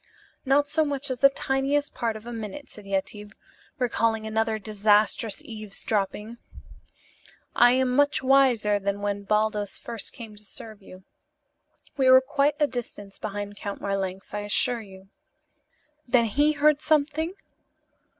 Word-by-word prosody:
"Not 275 +2 +3
so 310 +2 +1
much 285 -2 -3
as 250 - -4
the 275 - +7
tiniest 275 +2 -1
part 230 -3 -2
of 215 +1 -10
a 240 - -6
minute," 225 +5 -7
said 210 -2 -12
Yetive, 205 +2 -3 0.4
recalling 230 -3 0
another 220 0 0
disastrous 210 0 +1
eavesdropping. 215 +1 -4 1.2
"I 245 +1 +6
am 255 -1 +1
much 285 -1 +2
wiser 250 -6 +3
than 200 +1 -2
when 200 0 -3
Baldos 210 0 0
first 230 -3 -5
came 225 -3 -10
to 210 - -6
serve 215 +1 -10
you. 185 -1 -14 0.9
We 265 -2 +4
were 260 0 +9
quite 280 +2 +1
a 295 - +4
distance 230 -6 -7
behind 205 -1 -5
Count 200 0 -6
Marlanx, 195 -1 -4
I 210 - -2
assure 225 +3 +2
you." 190 -2 -14 1.0
"Then 240 -1 +3
he 290 +8 +2
heard 300 0 +3
something?" 310 +3 +1
225 Hz, 140 wpm, -25 LUFS, 205-270 Hz, 1.2 s, were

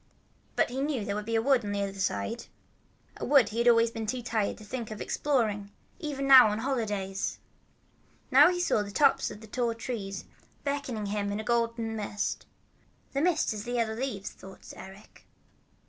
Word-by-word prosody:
But - - +2
he 265 +2 -2
knew 275 -7 -1
there 200 - -2
was 210 +1 -4
a 230 - +2
wood 250 +1 +3
on 205 -1 -3
the 200 0 0
other 195 -1 -3
side, 100 - -2 0.7
a - - -7
wood 275 -4 +5
he 225 - -4
had 235 - +2
always 230 -1 +5
been 225 -1 -5
too 245 +2 -2
tired 220 -3 -1
to - - -12
think 230 +1 -5
of 215 -1 -7
exploring, 215 -8 0 0.3
even 275 -5 -2
on 240 -6 +9
holidays. 210 -6 -2 0.9
Now - - +8
he 360 -1 -1
saw 350 -11 +2
the 205 - -5
tops 280 +8 +3
of 210 - -10
the 220 - -11
tall 235 +1 -1
trees 210 -5 -5 0.4
beckoning 280 -7 -2
him 200 0 -2
in 205 - -2
a - - -4
golden 230 -1 0
mist. 210 -1 -3 0.7
"The 275 - 0
mist 345 -8 +2
is 210 -1 -5
the 245 - -4
yellow 230 -2 0
leaves 220 -4 -4
they're 190 - -12
dropping," 190 - -15
thought - - -10
Eric. 190 +2 -13
225 Hz, 195 wpm, -29 LUFS, 205-255 Hz, 0.9 s, on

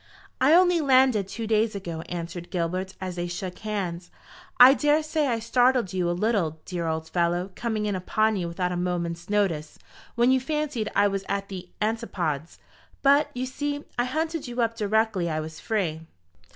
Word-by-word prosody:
"I 285 +5 +6
only 355 -2 +5
landed 260 -7 +4
two 225 +3 -5
days 220 0 +1
ago," 170 -5 -5
answered 175 0 -5
Gilbert, 185 +2 -2
as 185 -1 -5
they 175 0 -2
shook 180 +1 -5
hands. 190 -5 -4 0.5
"I 250 +2 +10
daresay 305 +1 +1
I 235 -3 +1
startled 245 -2 +2
you 180 -2 0
a 175 - -1
little, 195 -8 0
dear 175 -2 -3
old 160 0 -2
fellow, 175 +2 0
coming 220 0 -2
in 205 -2 -1
upon 215 +4 +1
you 180 -3 -2
without 180 +1 -2
a - - -2
moment's 175 -1 -3
notice, 185 -8 0 0.4
when 240 +2 +4
you 260 - +4
fancied 285 -5 -2
I 205 +1 +5
was 195 -1 -2
at 200 0 -2
the 185 -2 -7
Antipodes. 185 - -2 0.5
But, 285 +2 +5
you 250 +1 -2
see, 290 +2 -3 0.2
I 245 - +3
hunted 315 +3 -2
you 245 0 -6
up 230 0 -1
directly 215 -4 +1
I 155 -1 -1
was 155 0 -7
free." 165 -7 -2
200 Hz, 180 wpm, -26 LUFS, 175-245 Hz, 0.5 s, I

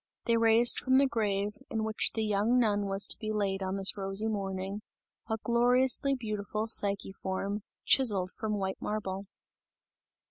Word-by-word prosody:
They 230 - +2
raised 230 +1 +4
from 260 0 +1
the 275 +1 +5
grave, 210 -4 -2
in 220 -1 -2
which 220 0 0
the 220 - -1
young 210 +4 +1
nun 205 -4 +1
was 195 +1 +1
to - - +3
be 215 -1 -4
laid 200 -2 -2
on 190 0 -3
this 195 0 +2
rosy 195 +2 0
morning, 195 -1 -4 0.5
a 220 - -1
gloriously 250 +4 +2
beautiful 215 -2 -4
Psyche 200 -3 +2
form, 195 +2 -4 0.2
chiseled 200 -8 +3
from 215 -2 -4
white 190 -1 -4
marble. 200 -2 -4
210 Hz, 155 wpm, -29 LUFS, 195-225 Hz, 0.5 s, the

